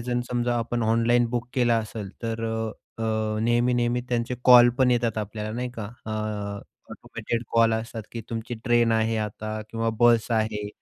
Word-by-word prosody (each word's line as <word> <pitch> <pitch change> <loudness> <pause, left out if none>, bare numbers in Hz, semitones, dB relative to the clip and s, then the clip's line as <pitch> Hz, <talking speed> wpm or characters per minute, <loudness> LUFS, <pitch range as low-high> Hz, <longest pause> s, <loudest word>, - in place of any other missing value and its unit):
जण 120 +1 -1
समजा 120 0 0
आपण 120 +1 -2
ऑनलाईन 115 +2 +3
बुक 120 0 -2
केलं 120 -2 +3
असेल, 110 -2 -6
तर 115 0 -3
अ, 110 0 -5
अ, 110 -1 -1
नेहमी-नेहमी 120 +1 +2
त्यांचे 120 0 -1
कॉल 120 -1 +9
पण 130 -1 +4
येतात 115 -2 +1
आपल्याला 105 0 -4
नाही 125 0 -3
का, 110 - -4 0.2
अ, 110 - -4 0.8
ऑटोमेटेड 115 0 -4
कॉल्स 115 -1 +4
असतात, 115 0 -7
की 115 - -4
तुमची 115 +2 -4
ट्रेन 120 -1 +3
आहे 110 0 +1
आता 110 0 -4
किंवा 115 0 -1
बस 120 -1 +4
आहे. 110 -2 0
115 Hz, 165 wpm, -25 LUFS, 110-120 Hz, 0.8 s, कॉल